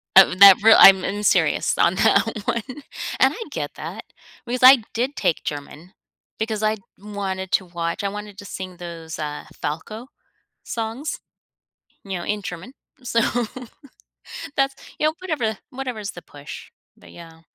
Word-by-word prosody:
Of 190 0 +7
that 200 -1 +10
real 225 +1 +7
I'm 190 -1 +8
I'm 205 +1 -3
serious - - +2
on - - +3
that - - +4 0.2
one, 230 +1 -1
and 275 +2 -1
I 460 - -6
get - - -5
that - - -7 0.4
because 250 +1 -3
I 255 -2 +8
did 255 +5 -2
take 160 - -1
German 150 +4 -7 0.4
because 220 -1 -2
I'd 215 -1 0 0.2
wanted 195 -2 -5
to 190 - +2
watch, 170 +1 -4
I 200 - 0
wanted 210 0 -8
to 200 - -10
sing 185 -2 -7
those, 170 -2 -8
uh, 150 -1 -5 0.2
Falco 215 - -5 0.6
songs, 230 +6 -4 0.9
you 195 -2 -4
know, 175 - -6
in 210 0 -2
German. 185 +6 -8 0.3
So, 235 -2 +1 1.4
that's 275 0 +1 0.2
you 305 - +3
know, 310 - 0
whatever 255 - -2
whatever's 250 -6 -5
the 175 - -11
push, 145 0 -11 0.3
but - - -17
yeah. 165 -1 -14
205 Hz, 155 wpm, -22 LUFS, 180-235 Hz, 1.4 s, that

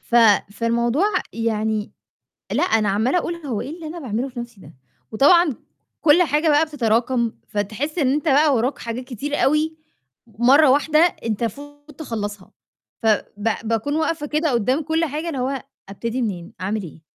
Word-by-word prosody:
ف - - -7 0.4
فالموضوع 235 - +1 0.3
يعني 220 -2 -1 0.6
لأ، - - +1
أنا 225 - +2
عَمّالة 220 - +1
أقول 345 -1 -2
هو 280 -10 -4
إيه - - -6
اللي 335 -2 -8
أنا 335 +3 -7
باعمله 250 -2 -3
في 250 -1 -8
نفسي 235 -4 -9
ده، 155 - -14 0.4
وطبعًا 310 +6 +5 0.5
كلّ 320 +3 +5
حاجة 305 +1 +1
بقى 300 +2 +4
بتتراكم 235 -4 0 0.2
فتحس 215 - -3
إن 270 -5 +2
أنت 300 +3 -2
بقى 290 +1 +4
وَراك 250 +4 0
حاجات 235 +2 -5
كتير 275 +3 -4
أوي، 305 +3 +1 0.5
مرّة 250 +7 +4
واحدة 295 +3 +3
أنت 230 - +1
المفروض 290 +6 -6
تخلّصها 205 - -5 0.5
فب 220 -2 +3 0.4
باكون 230 +6 -1
واقفة 320 -1 -1
كده 305 +1 0
قدّام 255 +6 +1
كلّ 320 +2 0
حاجة، 310 +3 -4
اللي 285 -6 -3
هو 265 +1 -2 0.3
ابتدي 230 +5 -3
منين، 195 -3 -4
أعمل 205 +2 -2
إيه؟ 165 -2 -11
260 Hz, 160 wpm, -21 LUFS, 225-305 Hz, 0.6 s, وطبعًا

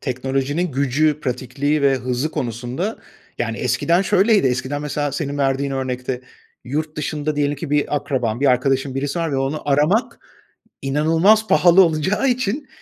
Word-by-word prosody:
teknolojinin 135 +5 -2
gücü, 140 +3 +1
pratikliği 135 +3 -1
ve 140 -1 +4
hızı 130 +4 -2
konusunda 125 - -4 0.4
Yani, - - -2
eskiden 170 +2 +1
şöyleydi: 200 - +3
Eskiden 130 +3 -2
mesela, 145 -1 -2
senin 145 0 -3
verdiğin 135 0 0
örnekte, 125 -1 -3 0.4
yurt 150 +4 -3
dışında 150 0 -3
diyelim 145 0 0
ki 160 -1 -6
bir 150 0 +1
akraban, 125 -5 -2
bir 140 - +2
arkadaşın, 135 +1 +1
birisi 140 +4 -2
var 165 -3 -1
ve - - 0
onu 135 +3 -2
aramak 155 - +2 0.6
inanılmaz 165 +10 +3
pahalı 180 +2 +6
olacağı 175 - 0
için, 255 +3 -1
145 Hz, 145 wpm, -20 LUFS, 135-160 Hz, 0.6 s, pahalı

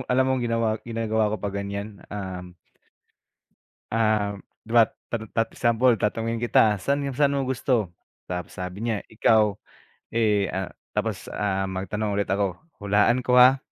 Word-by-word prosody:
alam 130 +1 +3
mong 130 -2 +1
ginawa 115 -1 +1 0.2
ginagawa 110 -2 0
ko - - 0
pa 105 - -2
ganyan 100 +1 -5
um 95 -3 -6 1.4
ah, 110 -2 +2 0.3
diba 115 0 +4 0.2
tat 110 -2 -3
tat 115 0 +2
example 120 +1 +3
tatanungin 115 +2 -1
kita 110 -3 +3
saan 140 +7 0
saan 140 +1 +2
mo 135 - 0
gusto? 125 -7 0 0.3
Tapos 90 -1 -6
sabi 90 +1 -5
niya 115 -2 0 0.2
ikaw, 110 -1 +4 0.6
eh, 105 -3 +2
ah, 95 -1 -3 0.2
tapos - - -2
ah, 95 -1 0
magtanong 100 +3 -3
ulit 100 0 -1
ako, 100 -2 +1 0.2
hulaan 105 +4 +3
ko 125 - +3
ha? 130 +2 +8
110 Hz, 145 wpm, -25 LUFS, 100-115 Hz, 1.4 s, ha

